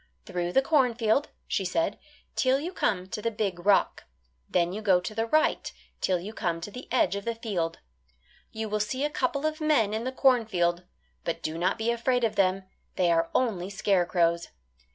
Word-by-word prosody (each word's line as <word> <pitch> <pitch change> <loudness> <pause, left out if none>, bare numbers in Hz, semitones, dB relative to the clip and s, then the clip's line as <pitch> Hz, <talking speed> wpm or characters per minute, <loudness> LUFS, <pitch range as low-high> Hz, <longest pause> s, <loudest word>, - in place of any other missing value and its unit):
"Through 175 -2 -3
the 270 - +4
cornfield," 250 -3 +2 0.2
she 195 - 0
said, 180 +2 -1 0.4
"'till 260 +1 +3
you 345 +6 -5
come 185 - 0
to 210 - -4
the 230 - 0
big 200 -5 -3
rock; 205 - +3 0.4
then 175 0 +1
you 210 - -4
go 190 -4 +4
to 180 +4 -6
the 225 +1 -1
right 310 +6 +2 0.3
'till 185 -2 +1
you 200 +5 -7
come 170 -5 -2
to 205 - -6
the 250 +5 -10
edge 255 -6 +2
of 200 - -4
the 230 +1 -2
field. 190 -8 -2 0.7
You 220 0 -4
will 215 0 -1
see 255 +7 -1
a 295 - -2
couple 280 +2 -1
of 310 +1 -1
men 285 -10 +3
in 220 +1 -2
the 255 - -2
cornfield. 205 -10 +2 0.4
But 165 0 -3
do 155 - -2
not 175 +3 0
be 225 +1 0
afraid 245 +1 +1
of 220 -2 +1
them; 190 -1 +2 0.3
they 175 -2 +2
are 165 0 +2
only 200 -8 0
scarecrows. 175 -4 +1
210 Hz, 195 wpm, -27 LUFS, 180-245 Hz, 0.7 s, the